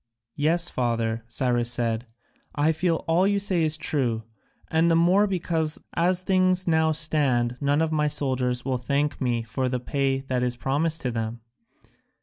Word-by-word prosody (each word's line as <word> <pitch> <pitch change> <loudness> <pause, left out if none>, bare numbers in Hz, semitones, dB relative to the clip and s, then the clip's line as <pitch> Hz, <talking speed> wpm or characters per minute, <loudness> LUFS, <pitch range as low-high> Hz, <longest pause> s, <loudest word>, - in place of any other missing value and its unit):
"Yes, 165 +4 +1
father," 115 -2 -1
Cyrus 120 0 0
said, 120 -1 -1 0.5
"I 150 +2 +3
feel 165 +1 -1
all 175 +4 +3
you 200 0 +2
say 195 -3 0
is 155 -1 +2
true, 125 -7 -1 0.5
and 160 +1 +2
the 165 - +3
more 180 +5 +4
because 165 -4 -1
as 180 +2 +1
things 185 -1 +2
now 160 -1 +3
stand 140 -6 +1
none 145 +2 +2
of 160 - -1
my 150 -1 +1
soldiers 130 -4 -1
will 130 -2 -1
thank 140 +4 -1
me 120 -3 0
for 130 +3 -2
the 125 0 -1
pay 135 +1 -1
that 130 -2 -2
is 125 -1 0
promised 150 +6 -1
them. 115 -2 -3
145 Hz, 160 wpm, -25 LUFS, 125-165 Hz, 0.5 s, more